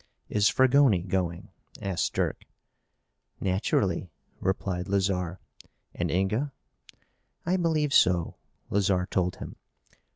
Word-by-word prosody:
"Is 105 0 +3
Fragoni 130 -8 +4
going?" 90 -2 -2 0.3
asked 95 -5 -1
Dirk. - - -1 0.9
"Naturally," 95 -1 0 0.3
replied 95 -1 -2
Lazarre. 95 -2 0 0.5
"And - - -2
Inga?" 110 +10 0 0.9
"I 175 +2 +2
believe 160 -5 +1
so," 90 -7 +3 0.3
Lazarre 95 -2 +2
told 90 -1 -1
him. - - -9
95 Hz, 95 wpm, -27 LUFS, 90-115 Hz, 0.9 s, Fragoni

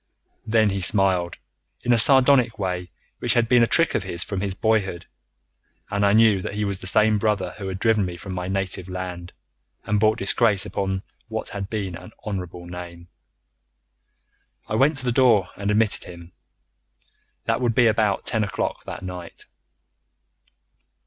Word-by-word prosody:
Then 110 -2 +3
he 95 0 -3
smiled 95 -3 +3 0.5
in 125 - +3
a 115 - +3
sardonic 130 -1 +5
way 90 -3 -3 0.3
which - - 0
had 120 -1 +2
been 125 0 +4
a 115 - +4
trick 165 +6 +3
of - - 0
his 90 -2 -1
from 100 -2 -4
his 100 -2 -2
boyhood, 95 -5 0 0.9
and 100 +1 0
I 100 0 +4
knew 110 -3 +4
that 100 - -5
he 105 0 -1
was 100 -2 -3
the - - -6
same 110 +2 +3
brother 100 -4 -1
who 100 - -5
had 95 0 -4
driven 110 0 +2
me 90 -2 -5
from 95 +2 -8
my 90 0 -4
native 95 -1 -2
land, 90 -1 -6 0.5
and 105 0 +1
brought 110 +1 +3
disgrace 110 -4 +1
upon 95 -1 -3 0.2
what 110 -1 -5
had 100 -1 -6
been 100 -5 -4
an 90 +6 -12
honourable 90 -4 -5
name. 85 -1 -9 1.6
I - - -5
went 140 +7 +3
to 130 - -4
the 125 - +1
door 115 -7 +3
and 100 0 -3
I - - +2
admitted 110 0 +1
him. 85 -1 -12 1.1
That - - 0
would 120 -3 0
be 120 - +4
about 110 -3 +1
ten 110 -1 0
o'clock 100 - -3
that - - -7
night. 90 -2 -8
100 Hz, 175 wpm, -23 LUFS, 90-110 Hz, 1.6 s, sardonic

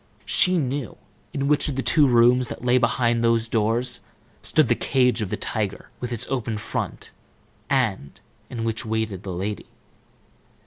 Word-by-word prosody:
She 185 -1 +4
knew 135 - -3 0.3
in 140 -3 -2
which 150 +1 +3
of 140 - -3
the 135 - -2
two 150 -3 +5
rooms, 125 +1 +4
that - - -8
lay 125 +1 +4
behind 120 -1 +1
those 115 -1 +2
doors, 115 +3 0 0.4
stood 155 -4 +2
the - - +3
cage 125 -3 +1
of 105 - -3
the - - -3
tiger, 105 -3 -4
with 125 0 -5
its 120 - +1
open 115 -4 -2
front, 110 - -5 0.6
and 110 - -1 0.3
in 115 -3 -5
which 115 0 -1
waited 110 -4 -3
the 95 - -6
lady. 95 +4 -4
120 Hz, 165 wpm, -23 LUFS, 110-130 Hz, 0.6 s, two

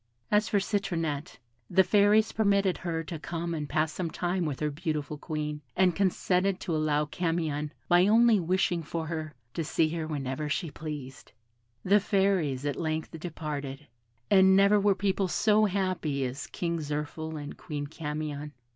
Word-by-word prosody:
As 210 +1 +3
for 205 - +2
Citronette, 165 -8 -2 0.3
the 190 +2 +5
Fairies 210 +2 +4
permitted 200 -3 +2
her 165 -2 -2
to 165 0 -6
come 170 +2 -4
and 150 -3 -4
pass 155 0 +1
some 175 0 -3
time 175 +2 -1
with 145 -4 -3
her 150 -1 0
beautiful 150 0 -3
Queen, 150 -1 -4
and 185 -3 +3
consented 190 0 +1
to 170 -4 -2
allow 150 -1 +1
Camion, 155 -2 -2 0.2
by 175 +2 +5
only 225 0 +5
wishing 180 0 +1
for 160 +1 -4
her, 155 -1 -5 0.2
to 165 - -2
see 160 0 +1
her 160 -1 -3
whenever 145 -1 -3
she 160 +1 -2
pleased. 145 -7 -8 0.5
The 200 +3 +5
Fairies 190 -9 +1
at 145 - -1
length 160 -1 -2
departed, 150 -4 -5 0.5
and 190 -1 +7
never 200 +2 +5
were 200 -1 +3
people 195 -1 0
so 215 +3 +3
happy 185 -8 -1
as 130 +3 -5
King 170 -1 -2
Zirphil 150 +1 -4
and 145 0 -7
Queen 145 -3 -5
Camion. 150 -1 -5
165 Hz, 160 wpm, -29 LUFS, 150-190 Hz, 0.5 s, and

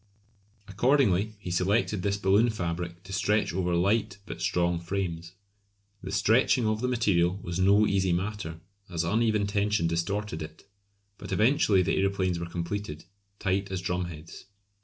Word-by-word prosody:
Accordingly 110 -2 +2
he 100 -3 -7
selected 100 +3 +1
this 100 +1 0
balloon 100 +4 +3
fabric 85 -3 -4
to 95 +1 -9
stretch 105 +1 +1
over 90 -1 0
light 100 +3 +1
but - - -8
strong 85 -1 +1
frames. 85 -1 -4 0.7
The 95 - -6
stretching 110 +5 +3
of 110 0 0
the 125 - 0
material 95 -7 +2
was 85 +1 -4
no 100 +3 +5
easy 95 -2 +1
matter, 90 -2 -3 0.3
as 85 -1 -2
uneven 110 -2 +1
tension 100 -1 0
distorted 85 +2 -2
it; 80 0 -9 0.6
but - - -8
eventually 110 -5 +3
the - - 0
aeroplanes 95 -2 0
were 85 - -4
completed, 85 -2 -5 0.3
tight 100 0 -1
as 95 - -2
drumheads. 90 -3 -5
95 Hz, 145 wpm, -28 LUFS, 85-105 Hz, 0.7 s, no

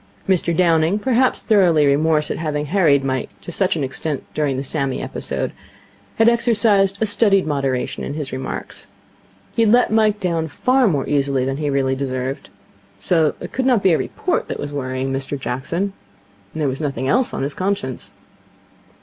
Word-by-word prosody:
Mr 180 -3 +2
Downing, 165 +1 +3
perhaps 255 +3 +1
through 195 -6 +4
remorse 150 +1 +2
at - - -3
having 150 -2 -2
harried 150 -5 +3
Mike 130 -1 -2
to - - -8
such 185 +1 0
an 155 - -2
extent 135 +2 -3
during 145 -3 -1
the 135 - -3
Sammy 135 -2 -2
episode, - - -3 0.6
had 225 - +3
exercised 215 -4 +3
a 220 - +2
studied 205 -2 +3
moderation 135 -4 -2
in 140 - -5
his 150 -3 -5
remarks. 130 0 -6 0.7
He - - +2
had 220 -2 +4
let 245 -1 +4
Mike 215 -1 +2
down 165 -3 -1
far 255 - +2
more 145 -8 0
easily 140 -2 +1
than 135 +1 -2
he 150 -1 -2
really 135 -1 +1
deserved. 130 0 -4 0.5
So 160 -4 +1
it - - -8
could 260 0 -1
not 245 -6 +3
be 185 - +4
a - - +3
report 360 - -2
that - - -5
was 145 0 -5
worrying 130 -1 -3
Mr 135 +1 -3
Jackson. 165 +11 -3 0.6
And 155 - -5
there 145 - +1
was 135 +3 -3
nothing 135 -3 -2
else 245 - +2
on - - -3
his 140 +1 -2
conscience. 185 -10 -3
155 Hz, 180 wpm, -20 LUFS, 135-200 Hz, 0.7 s, through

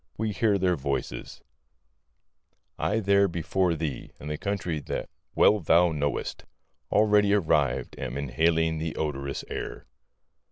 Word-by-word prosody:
We 110 0 -1
hear 105 0 +2
their 90 -2 +2
voices 70 -4 -4 1.4
I 110 - +1
there 100 0 +4
before 90 0 0
thee, 75 -5 -4
in 75 - -7
the 75 - -2
country 95 -6 -2
that - - -4 0.3
well 105 - +5
thou 85 0 +4
knowest, 75 -2 -2 0.5
Already 105 -1 +4
arrived 75 -9 +1
am 65 0 -4
inhaling 80 +4 +1
the 80 0 -3
odorous 70 -3 -3
air. - - -6
80 Hz, 125 wpm, -27 LUFS, 75-100 Hz, 1.4 s, well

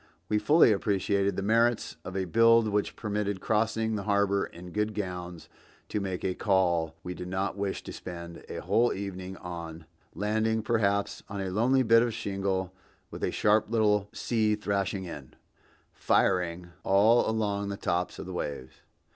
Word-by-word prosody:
We 105 - +2
fully 145 +4 +5
appreciated 100 -1 +1
the 100 - -2
merits 115 +2 +2
of 95 +1 -5
a 95 - 0
build 115 +5 +5
which 105 0 -1
permitted 105 -2 -2
crossing 110 +1 0
the 105 - -2
harbor 100 -1 +2
in 90 +1 -11
good 105 +1 -1
gowns 90 -4 -5 0.4
to 105 - -1
make 95 -3 -4
a 95 - +1
call 85 -6 +1
we 90 - -4
did 90 0 -7
not 95 +2 -2
wish 100 -1 -3
to - - -8
spend 85 -1 -8
a - - -5
whole 115 +8 +2
evening 95 -1 -6
on, 85 -2 -7 0.3
landing 110 +3 0
perhaps 100 -3 0
on 100 0 -5
a 95 -1 -3
lonely 125 +7 +3
bit 115 0 +6
of 120 -2 0
shingle 95 -2 -2 0.4
with - - -7
a - - +2
sharp 105 0 +2
little 105 -3 +2
sea 110 -2 0
thrashing 100 -2 -2
in, 75 -6 -9 0.6
"firing" 85 -1 +1
all 110 +5 +4
along 100 -2 -1
the 100 - -4
tops 90 -1 -1
of - - -7
the 95 - -7
waves. 70 -6 -5
100 Hz, 165 wpm, -28 LUFS, 90-110 Hz, 0.6 s, bit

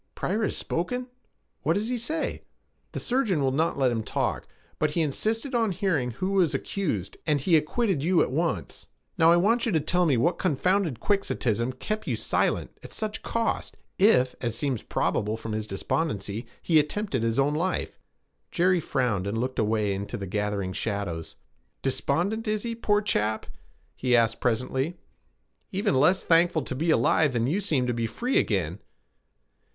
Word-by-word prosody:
'Pryor 210 +5 -1
has 215 - +1
spoken? 250 +9 -2 0.5
What 155 +4 +2
does 210 +5 -1
he 250 - 0
say?' 310 +7 -2 0.5
'The - - -4
surgeon 240 - +1
will 135 - +2
not 160 +5 0
let 130 -3 +3
him 115 -2 -1
talk; - - -2 0.3
but 155 - +2
he 165 +3 0
insisted 220 - -1
on 225 -4 +2
hearing 175 -9 0
who 185 - -3
was 175 -7 +2
accused, 135 - -3
and 150 -2 +3
he 165 +5 +3
acquitted 160 - +1
you 175 +1 +3
at - - -3
once. 165 +4 -2 0.3
Now 165 +1 +7
I - - +7
want 230 +7 +2
you - - +1
to 160 - +4
tell 175 +4 +1
me 135 -5 +3
what 170 +9 +1
confounded 180 - +1
quixotism 125 - 0
kept 215 +11 -4
you - - 0
silent, - - 0
at - - -11
such 215 -1 -4
cost, 230 0 -2 0.2
if, 130 - +5
as 115 -2 -2
seems 135 -5 -1
probable 105 +2 -1
from 115 0 -6
his 110 0 -3
despondency, 105 -1 -2 0.2
he 160 -2 +5
attempted 150 - -1
his 115 0 0
own 140 +2 +3
life.' 175 +5 -2 0.5
Jerry 180 +1 +3
frowned, 125 - -1
and 105 +3 -2
looked 130 +3 -2
away 105 -2 +1
into 100 +1 -4
the 100 - -5
gathering 100 -1 -2
shadows. 100 -7 -3 0.5
'Despondent 175 - 0
is 215 -1 0
he, 235 -1 -2
poor 210 -2 +1
chap?' 110 - 0 0.5
he 125 -1 +2
asked 115 -1 +2
presently. 130 +7 0 0.7
'Even 200 0 0
less 180 +8 +4
thankful 165 -2 +3
to 130 - -5
be 160 +6 -1
alive 150 +1 +3
than 120 -1 +1
you 160 +10 +1
seem 155 -10 +1
to 125 - 0
be 115 -1 -1
free 245 - 0
again.' 90 -3 -1
150 Hz, 175 wpm, -26 LUFS, 115-195 Hz, 0.7 s, Now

